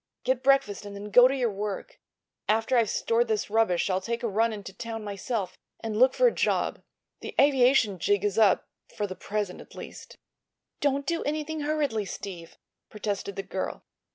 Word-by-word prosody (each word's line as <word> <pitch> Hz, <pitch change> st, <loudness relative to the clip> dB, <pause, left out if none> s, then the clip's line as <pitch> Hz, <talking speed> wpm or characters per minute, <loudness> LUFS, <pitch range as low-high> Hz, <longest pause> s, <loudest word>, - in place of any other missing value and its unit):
Get 255 Hz, 0 st, +1 dB
breakfast 270 Hz, -7 st, +2 dB
and 205 Hz, -1 st, -8 dB
then 205 Hz, +1 st, -7 dB
go 245 Hz, +4 st, +8 dB
to 270 Hz, -, -1 dB
your 245 Hz, -4 st, 0 dB
work. 205 Hz, -, -5 dB, 0.5 s
After 225 Hz, +4 st, +2 dB
I've 230 Hz, -4 st, +3 dB
stored 235 Hz, +1 st, +1 dB
this 215 Hz, -2 st, -1 dB
rubbish 220 Hz, -6 st, +2 dB
I'll 190 Hz, -1 st, 0 dB
take 235 Hz, +4 st, -3 dB
a -, -, +1 dB
run 225 Hz, +2 st, +2 dB
into 205 Hz, -3 st, -7 dB
town 225 Hz, +2 st, -6 dB
myself, 205 Hz, 0 st, -4 dB, 0.2 s
and 225 Hz, -2 st, -4 dB
look 255 Hz, +4 st, +5 dB
for -, -, +4 dB
a 480 Hz, -, +5 dB
job. -, -, 0 dB, 0.4 s
The -, -, -8 dB
aviation 255 Hz, -7 st, +4 dB
jig 205 Hz, +3 st, +1 dB
is 205 Hz, +1 st, +1 dB
up—for 210 Hz, 0 st, +1 dB
the 185 Hz, -2 st, -6 dB
present, 205 Hz, -2 st, -3 dB
at -, -, -15 dB
least." -, -, -10 dB, 0.6 s
"Don't 280 Hz, -1 st, +1 dB
do 335 Hz, +3 st, -1 dB
anything 310 Hz, +1 st, -2 dB
hurriedly, 290 Hz, -8 st, 0 dB
Steve," 180 Hz, -3 st, -8 dB, 0.3 s
protested 205 Hz, -2 st, -4 dB
the 195 Hz, -, -4 dB
girl. 190 Hz, 0 st, -4 dB
220 Hz, 180 wpm, -27 LUFS, 200-260 Hz, 0.6 s, go